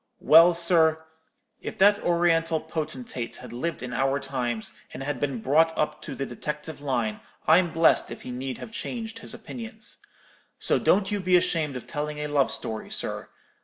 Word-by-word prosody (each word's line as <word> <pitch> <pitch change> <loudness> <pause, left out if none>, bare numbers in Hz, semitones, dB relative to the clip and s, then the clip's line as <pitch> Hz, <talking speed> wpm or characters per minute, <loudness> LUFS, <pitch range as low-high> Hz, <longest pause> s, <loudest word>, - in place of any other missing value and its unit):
Well, 165 +2 +7
sir, 160 -2 +3 0.6
if - - -6
that 205 +1 +5
Oriental 165 -2 +2
potentate 135 -7 -5
had - - -9
lived 150 +4 -3
in 125 0 -5
our 135 +3 +1
times, 125 -5 -3 0.2
and 135 -1 -4
been 135 -5 -2
brought 160 +4 +3
up 150 - -1
to - - -7
the 135 - -3
detective 150 +5 -6
line, 120 -6 -1 0.3
I'm 170 +2 +5
blest 165 0 +4
if - - -8
he 125 - -6
need 130 +1 -4
have - - -9
changed 225 -1 -5
his 225 - -4
opinions. 225 -1 -8 0.6
So - - +3
don't 195 0 +2
you 205 - 0
be 185 -1 +3
ashamed 165 -5 +1
of 125 - -6
telling 150 0 -4
a 150 - -3
love 145 -2 +2
story, 110 -1 -3
sir. - - -3
155 Hz, 170 wpm, -26 LUFS, 135-175 Hz, 0.6 s, Well